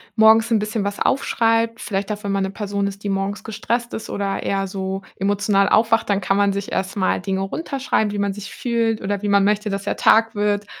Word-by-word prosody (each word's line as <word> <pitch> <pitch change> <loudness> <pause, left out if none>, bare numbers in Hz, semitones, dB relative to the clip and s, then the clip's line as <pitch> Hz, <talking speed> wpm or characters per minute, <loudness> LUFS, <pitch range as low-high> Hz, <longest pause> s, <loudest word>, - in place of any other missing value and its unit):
morgens 220 +1 +5
'n 225 - +4
bisschen 210 0 -2
was 200 0 -3
aufschreibt. 230 -3 +1
Vielleicht 200 0 -3
auch, 210 +1 -5
wenn 200 - -2
man 195 -1 +1
'ne 190 - -1
Person 200 -1 -2
ist, 200 0 -7
die 205 - -2
morgens 195 +1 -2
gestresst 235 +2 -3
ist, 220 - -6
oder 200 -1 -2
eher 195 0 -1
so 190 0 -4
emotional 200 0 +2
aufwacht, 225 0 +3
dann 200 -1 +2
kann 195 - +1
man 200 0 +3
sich 200 0 -4
erstmal 190 0 -1
Dinge 190 0 -2
runterschreiben, 260 -1 -1
wie 205 - -4
man 200 -1 0
sich 200 0 -8
fühlt 230 -2 -1
oder 200 0 -2
wie 210 - -2
man 200 0 +4
möchte, 210 +1 +1
dass 195 0 -3
der 205 - -2
Tag 225 0 +4
wird 205 0 0
205 Hz, 220 wpm, -21 LUFS, 195-220 Hz, -, morgens